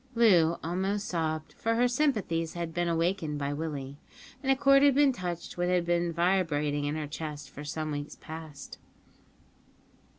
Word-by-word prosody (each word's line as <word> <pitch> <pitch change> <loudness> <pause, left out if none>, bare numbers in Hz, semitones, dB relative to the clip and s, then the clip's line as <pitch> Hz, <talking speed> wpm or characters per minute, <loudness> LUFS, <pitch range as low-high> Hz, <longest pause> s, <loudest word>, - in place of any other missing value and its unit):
Loo 175 -8 +5
almost 195 +5 -1
sobbed, 160 -2 -2
for 230 0 -1
her 245 +2 +4
sympathies 215 - 0
had 170 -2 -4
been 175 +1 0
awakened 165 -2 0
by 140 0 -2
Willie, 145 -3 -5 0.4
and 270 -1 +1
a - - +5
chord 275 +1 +5
had 285 -2 +5
been 285 -1 +5
touched 175 -7 -5
which 175 0 0
had 180 -1 +2
been 175 0 +1
vibrating 160 -5 +1
in 145 +1 -1
her 155 -1 -3
breast 150 -2 -6
for 145 - -8
some 155 +1 -3
weeks 145 0 -5
past. 160 -2 -9
170 Hz, 165 wpm, -29 LUFS, 155-195 Hz, 0.4 s, Loo